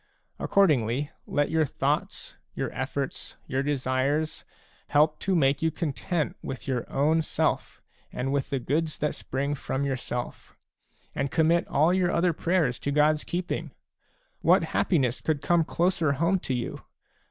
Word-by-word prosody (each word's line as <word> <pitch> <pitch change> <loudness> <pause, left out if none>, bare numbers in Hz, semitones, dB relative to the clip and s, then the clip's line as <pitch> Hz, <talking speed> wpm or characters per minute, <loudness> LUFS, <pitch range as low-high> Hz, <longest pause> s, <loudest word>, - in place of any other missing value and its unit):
Accordingly, 145 - +2 0.2
let 145 +1 0
your 160 -1 +3
thoughts, - - -2 0.2
your - - -2
efForts, - - -4
your 130 +1 -1
desires, 140 +2 0 0.4
help 150 +1 +3
to 190 -1 0
make 140 -3 +3
you 160 - +3
content 160 0 -2
with 130 - -6
your 125 -3 -2
own 155 +4 +3
self - - -1 0.3
and 135 +2 -2
with 140 -2 -1
the 140 - 0
goods 155 +5 -1
that 150 - -1
spring 140 +2 -2
from 140 -1 -2
yourself; 125 -2 -4 0.6
and 140 - -1
commit 165 +3 +2
all 155 +5 +3
your 185 -1 +2
other 175 0 +2
prayers 160 -7 +1
to - - -3
God's 150 +1 +3
keeping! 170 -4 -3 0.7
What 180 +2 +5
happiness 130 -9 +1
could 155 -3 -1
come 175 -1 +3
closer 170 -2 +1
home 170 +7 +1
to 135 - -3
you 120 - -4
150 Hz, 145 wpm, -27 LUFS, 135-165 Hz, 0.7 s, What